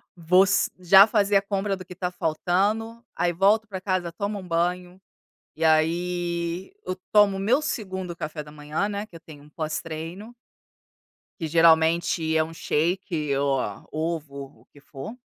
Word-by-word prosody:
vou 180 Hz, +3 st, +4 dB
se -, -, +1 dB
já 190 Hz, +3 st, +8 dB
fazer 205 Hz, -2 st, +1 dB
a 195 Hz, -, +6 dB
compra 200 Hz, 0 st, -2 dB
do 185 Hz, -, -10 dB
que 180 Hz, -, -19 dB
está 180 Hz, 0 st, -3 dB
faltando. 200 Hz, +8 st, -1 dB
Aí, 175 Hz, 0 st, 0 dB
volto 205 Hz, +5 st, +3 dB
para 190 Hz, -2 st, -6 dB
casa, 185 Hz, -3 st, -2 dB
tomo 205 Hz, 0 st, -3 dB
um 185 Hz, -, -10 dB
banho, 180 Hz, +1 st, -1 dB, 0.6 s
e 160 Hz, -, -9 dB
aí 170 Hz, -, 0 dB
eu 185 Hz, -, -3 dB, 0.2 s
tomo 205 Hz, -2 st, +5 dB
o -, -, -4 dB
meu 240 Hz, +9 st, +2 dB
2º 190 Hz, -, -4 dB
café 155 Hz, -1 st, -5 dB
da 150 Hz, -, -13 dB
manhã, 150 Hz, +6 st, -3 dB
né, 205 Hz, +1 st, -4 dB
que -, -, -23 dB
eu 165 Hz, -, -10 dB
tenho 150 Hz, -3 st, -14 dB
um 150 Hz, -, -18 dB
pós-treino 165 Hz, +7 st, -5 dB, 1.1 s
que 165 Hz, -, -3 dB
geralmente 160 Hz, 0 st, +3 dB
é 160 Hz, -, +4 dB
um 160 Hz, -, -8 dB
shake 165 Hz, -2 st, -1 dB
ou 140 Hz, -1 st, +1 dB
a 105 Hz, -5 st, -5 dB
ovo, 150 Hz, -4 st, -5 dB
o -, -, -25 dB
que 145 Hz, -, -17 dB
for. 140 Hz, -, -9 dB
175 Hz, 175 wpm, -25 LUFS, 160-195 Hz, 1.1 s, já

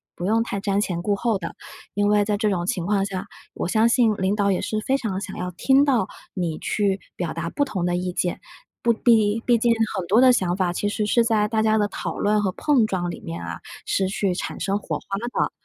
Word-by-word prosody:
不 175 Hz, -, -5 dB
用 225 Hz, +2 st, +3 dB
太 200 Hz, -4 st, -4 dB
瞻 200 Hz, -1 st, 0 dB
前 180 Hz, -5 st, -1 dB
顾 205 Hz, +3 st, +1 dB
后 220 Hz, -1 st, 0 dB
的。 -, -, -6 dB, 0.4 s
因 205 Hz, 0 st, +2 dB
为 210 Hz, 0 st, +4 dB
在 205 Hz, 0 st, 0 dB
这 210 Hz, -1 st, +1 dB
种 175 Hz, -2 st, -1 dB
情 175 Hz, -3 st, -1 dB
况 200 Hz, 0 st, +1 dB
下， 190 Hz, 0 st, -4 dB, 0.3 s
我 -, -, -2 dB
相 220 Hz, +4 st, +3 dB
信 235 Hz, -2 st, +4 dB
领 190 Hz, +2 st, +1 dB
导 200 Hz, -1 st, +2 dB
也 185 Hz, -, 0 dB
是 215 Hz, -, -2 dB
非 265 Hz, -, +1 dB
常 215 Hz, -8 st, -3 dB
想 195 Hz, -1 st, -6 dB
要 180 Hz, 0 st, -3 dB
听 265 Hz, +10 st, +3 dB
到 255 Hz, -9 st, +2 dB, 0.3 s
你 170 Hz, -4 st, -2 dB
去 200 Hz, -2 st, 0 dB, 0.2 s
表 175 Hz, -3 st, -3 dB
达 165 Hz, 0 st, -3 dB
不 285 Hz, -, 0 dB
同 190 Hz, -10 st, -3 dB
的 175 Hz, -, +1 dB
意 180 Hz, 0 st, -2 dB
见， 175 Hz, 0 st, -1 dB, 0.4 s
不 235 Hz, -1 st, +3 dB
必 220 Hz, -2 st, +3 dB
毕 240 Hz, -1 st, +4 dB
竟 235 Hz, +1 st, +2 dB, 0.2 s
很 185 Hz, -3 st, -2 dB
多 210 Hz, +6 st, +4 dB
的 255 Hz, -1 st, +7 dB
想 180 Hz, -6 st, +1 dB
法 185 Hz, -2 st, +1 dB
其 205 Hz, -, -1 dB
实 210 Hz, 0 st, -1 dB
是 235 Hz, +3 st, +3 dB
在 220 Hz, -2 st, +2 dB
大 220 Hz, 0 st, 0 dB
家 220 Hz, 0 st, +3 dB
的 205 Hz, -1 st, +2 dB
讨 -, -, -5 dB
论 210 Hz, +1 st, +2 dB
和 195 Hz, -2 st, 0 dB
碰 275 Hz, -4 st, +2 dB
撞 175 Hz, -3 st, -2 dB
里 -, -, -8 dB
面 85 Hz, +1 st, -6 dB
啊， 85 Hz, 0 st, -6 dB, 0.3 s
是 190 Hz, -, +1 dB
去 195 Hz, 0 st, 0 dB
产 180 Hz, -, -5 dB
生 195 Hz, +1 st, 0 dB
火 -, -, -3 dB
花 195 Hz, -, -5 dB
的。 240 Hz, +2 st, -1 dB
205 Hz, 265 characters per minute, -23 LUFS, 185-220 Hz, 0.4 s, 的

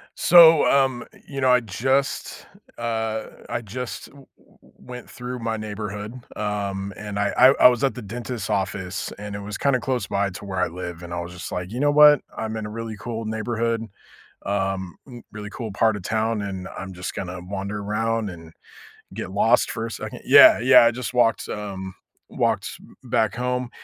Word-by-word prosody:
So, 165 Hz, -3 st, +7 dB
um, 135 Hz, -3 st, +2 dB, 0.2 s
you 140 Hz, -1 st, -6 dB
know, 130 Hz, -1 st, +3 dB
I 125 Hz, 0 st, +5 dB
just 130 Hz, +6 st, -1 dB, 0.3 s
uh, 110 Hz, -1 st, -2 dB, 0.3 s
I 120 Hz, -, -2 dB
just 120 Hz, +4 st, -6 dB
w 140 Hz, -1 st, -17 dB
w -, -, -26 dB
went 125 Hz, 0 st, -10 dB
through 125 Hz, 0 st, -6 dB
my 115 Hz, -1 st, -2 dB
neighborhood, 105 Hz, 0 st, -6 dB, 0.2 s
um, 100 Hz, -1 st, -3 dB
and 105 Hz, -1 st, -6 dB
I 100 Hz, 0 st, +1 dB
I 130 Hz, -, +8 dB
I -, -, +11 dB
was 125 Hz, +2 st, -1 dB
at 135 Hz, -, +1 dB
the 125 Hz, -, -7 dB
dentist's 115 Hz, 0 st, -6 dB
office, 100 Hz, -1 st, -2 dB
and 105 Hz, 0 st, -7 dB
it -, -, -5 dB
was, 105 Hz, +1 st, -6 dB
kinda, 140 Hz, -2 st, +2 dB
close 125 Hz, -6 st, -2 dB
by 100 Hz, 0 st, 0 dB
to 90 Hz, -, -9 dB
where 95 Hz, -2 st, -4 dB
I -, -, +2 dB
live, 85 Hz, 0 st, -7 dB
and 85 Hz, -, -7 dB
I 85 Hz, -, -2 dB
was 85 Hz, 0 st, -7 dB
just 90 Hz, -, -8 dB
like, 90 Hz, +1 st, -4 dB
"You 120 Hz, -, -4 dB
know 145 Hz, +1 st, +3 dB
what, 150 Hz, -1 st, +7 dB
I'm 110 Hz, 0 st, -4 dB
in 110 Hz, -, -4 dB
a -, -, -6 dB
really 115 Hz, -1 st, -6 dB
cool 115 Hz, 0 st, -5 dB
neighborhood, 115 Hz, +1 st, -2 dB, 0.6 s
um, 95 Hz, -3 st, -2 dB, 0.4 s
really 105 Hz, -1 st, -7 dB
cool 115 Hz, -4 st, -6 dB
part 110 Hz, +2 st, +2 dB
of 105 Hz, -, -6 dB
town, 110 Hz, +1 st, -1 dB
and 95 Hz, -2 st, -5 dB
I'm 95 Hz, 0 st, -6 dB
just 90 Hz, 0 st, -6 dB
gonna 90 Hz, -1 st, -5 dB
wander 100 Hz, +2 st, -5 dB
around 110 Hz, +1 st, -1 dB
and, 80 Hz, -2 st, -11 dB, 0.6 s
get 95 Hz, -, -6 dB
lost 115 Hz, +4 st, +3 dB
for 115 Hz, 0 st, -4 dB
a -, -, -8 dB
second" -, -, -7 dB
Yeah, -, -, +8 dB
yeah, 125 Hz, +1 st, +7 dB
I -, -, +4 dB
just 125 Hz, +1 st, -5 dB
walked 120 Hz, -2 st, +2 dB
um, 95 Hz, -3 st, -6 dB, 0.3 s
walked -, -, 0 dB, 0.3 s
back 110 Hz, -3 st, +1 dB
home, 125 Hz, 0 st, -2 dB
110 Hz, 190 wpm, -23 LUFS, 100-120 Hz, 0.6 s, I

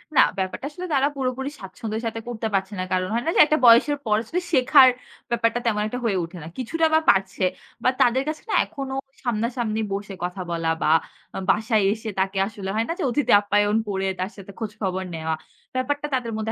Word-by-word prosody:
না -, -, +8 dB, 0.2 s
ব্যাপারটা 190 Hz, +7 st, -3 dB
আসলে 360 Hz, +5 st, -7 dB
তারা 275 Hz, 0 st, +3 dB
পুরোপুরি 265 Hz, 0 st, -2 dB
স্বাচ্ছন্দ্যের 220 Hz, +3 st, -5 dB
সাথে 225 Hz, 0 st, -3 dB
করতে 230 Hz, -2 st, -3 dB
পারছে 195 Hz, +1 st, 0 dB
না। -, -, 0 dB
কারণ 185 Hz, 0 st, +1 dB
হয় 235 Hz, +1 st, 0 dB
না -, -, +1 dB
যে, -, -, +3 dB
একটা 305 Hz, +1 st, +2 dB
বয়সের 240 Hz, +5 st, +6 dB
পর 210 Hz, -1 st, +3 dB, 0.3 s
শেখার, 260 Hz, -2 st, +7 dB, 0.4 s
ব্যাপারটা 235 Hz, 0 st, +1 dB
তেমন 210 Hz, -3 st, +1 dB
একটা 245 Hz, +3 st, -4 dB
হয়ে 200 Hz, -4 st, +1 dB
উঠে 170 Hz, +2 st, -8 dB
না। -, -, -8 dB
কিছুটা 320 Hz, +6 st, 0 dB
বা 315 Hz, -, +6 dB
পারছে, 190 Hz, -1 st, +2 dB, 0.4 s
বা -, -, +5 dB
তাদের 255 Hz, +2 st, +4 dB
কাছে 310 Hz, 0 st, -5 dB
না -, -, +1 dB
এখনো 270 Hz, -1 st, -6 dB, 0.3 s
সামনাসামনি 235 Hz, -1 st, -1 dB
বসে 200 Hz, 0 st, -4 dB
কথা 180 Hz, +2 st, -3 dB
বলা 165 Hz, -1 st, -1 dB
বা -, -, +3 dB, 0.6 s
বাসায় 215 Hz, +1 st, +3 dB
এসে 220 Hz, 0 st, -6 dB
তাকে 190 Hz, +1 st, 0 dB
আসলে 200 Hz, -3 st, -6 dB
হয় 225 Hz, +1 st, +1 dB
না -, -, +1 dB
যে, -, -, -1 dB
অতিথি 250 Hz, 0 st, +1 dB
আপ্যায়ন 205 Hz, +1 st, +2 dB
করে 195 Hz, -1 st, -1 dB
তার 185 Hz, +1 st, -1 dB
সাথে 200 Hz, -1 st, -11 dB
খোঁজ 220 Hz, -3 st, -3 dB
খবর 190 Hz, -1 st, -1 dB
নেওয়া। 160 Hz, 0 st, -2 dB, 0.4 s
ব্যাপারটা 290 Hz, +3 st, -1 dB
তাদের 235 Hz, -3 st, -2 dB
মধ্যে 220 Hz, 0 st, -2 dB
220 Hz, 200 wpm, -24 LUFS, 195-255 Hz, 0.6 s, না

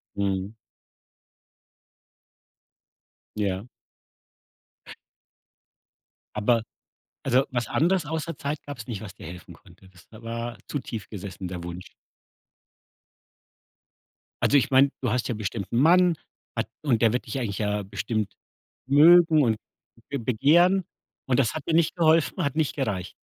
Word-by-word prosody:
Mhm. 100 Hz, 0 st, -1 dB, 2.8 s
Ja. 100 Hz, 0 st, -2 dB, 2.7 s
Aber 115 Hz, +2 st, +2 dB, 0.6 s
also, 130 Hz, 0 st, +3 dB
was 120 Hz, -3 st, -1 dB
anderes 175 Hz, +2 st, +1 dB
außer 160 Hz, +2 st, -4 dB
Zeit 145 Hz, +1 st, -4 dB
gab's 130 Hz, -6 st, -8 dB
nicht, 110 Hz, -5 st, -5 dB
was 100 Hz, -4 st, -8 dB
dir -, -, -12 dB
helfen 90 Hz, +1 st, -10 dB
konnte? 95 Hz, -, -19 dB
Das 90 Hz, -1 st, -20 dB
da 110 Hz, +1 st, -14 dB
war 115 Hz, +1 st, -5 dB
zu 145 Hz, -, -2 dB
tief 115 Hz, -6 st, -7 dB
gesessen 100 Hz, -2 st, -7 dB
der 90 Hz, -1 st, -6 dB
Wunsch. 85 Hz, +1 st, -7 dB, 2.5 s
Also, 145 Hz, -, +5 dB
ich 135 Hz, -, +2 dB
meine, 135 Hz, +1 st, +6 dB
du 125 Hz, -, 0 dB
hast 125 Hz, +1 st, 0 dB
ja 120 Hz, -, -2 dB
bestimmt 100 Hz, -1 st, -4 dB
'nen 120 Hz, -, +2 dB
Mann 175 Hz, +2 st, +5 dB, 0.7 s
und 125 Hz, -7 st, +1 dB
der 115 Hz, -2 st, +5 dB
wird 125 Hz, -, -1 dB
dich 125 Hz, +4 st, -4 dB
eigentlich 105 Hz, -6 st, -3 dB
ja 105 Hz, -1 st, -1 dB
bestimmt 105 Hz, +2 st, -3 dB, 0.5 s
mögen 160 Hz, +2 st, +7 dB
und 115 Hz, -3 st, +2 dB, 0.5 s
be 140 Hz, -, -2 dB
begehren. 165 Hz, -, +3 dB, 0.4 s
Und 130 Hz, -1 st, +2 dB
das 120 Hz, -5 st, +2 dB
hat 155 Hz, -, -6 dB
dir 165 Hz, -, 0 dB
nicht 165 Hz, -2 st, +2 dB
geholfen, 165 Hz, -2 st, +3 dB
hat 140 Hz, -1 st, -1 dB
nicht 155 Hz, -3 st, 0 dB
gereicht? 100 Hz, -10 st, -2 dB
120 Hz, 130 wpm, -26 LUFS, 105-145 Hz, 2.8 s, mögen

